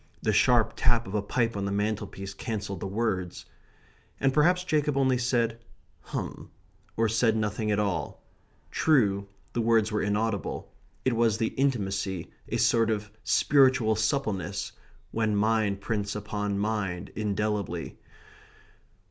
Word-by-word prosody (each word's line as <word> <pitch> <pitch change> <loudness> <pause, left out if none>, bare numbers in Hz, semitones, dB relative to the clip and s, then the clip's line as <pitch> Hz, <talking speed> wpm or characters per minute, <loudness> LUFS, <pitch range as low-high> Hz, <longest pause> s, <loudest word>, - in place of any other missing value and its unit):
The - - +2
sharp 120 -3 +4
tap 120 -1 +2
of 95 - -8
a 105 - +1
pipe 115 +2 0
on 100 -1 -2
the 100 - -1
mantelpiece 100 -1 -2
cancelled 100 -3 -4
the 95 - -4
words. 95 -4 -2 0.7
And 135 -1 +2
perhaps 180 +5 +4
Jacob 150 -4 +1
only 130 -2 +3
said 120 -2 +1 0.5
"hum," - - -5 0.5
or 115 0 +3
said 115 0 +2
nothing 105 0 -1
at 105 - +2
all. 95 -8 -1 0.5
True, 100 -10 +2 0.3
the 120 - 0
words 115 -1 +3
were 105 - 0
inaudible. 105 -2 -2 0.3
It 130 -2 +2
was 115 -2 +3
the 115 -1 0
intimacy, 100 -9 -1 0.2
a 115 - 0
sort 115 0 +3
of 105 -1 -2
spiritual 130 -6 +4
suppleness, 105 - -1 0.4
when 110 -2 0
mind 105 -2 +1
prints 100 -2 -2
upon 105 -1 -2
mind 100 -4 -2
indelibly. 105 -4 -2
110 Hz, 135 wpm, -28 LUFS, 100-115 Hz, 0.7 s, sharp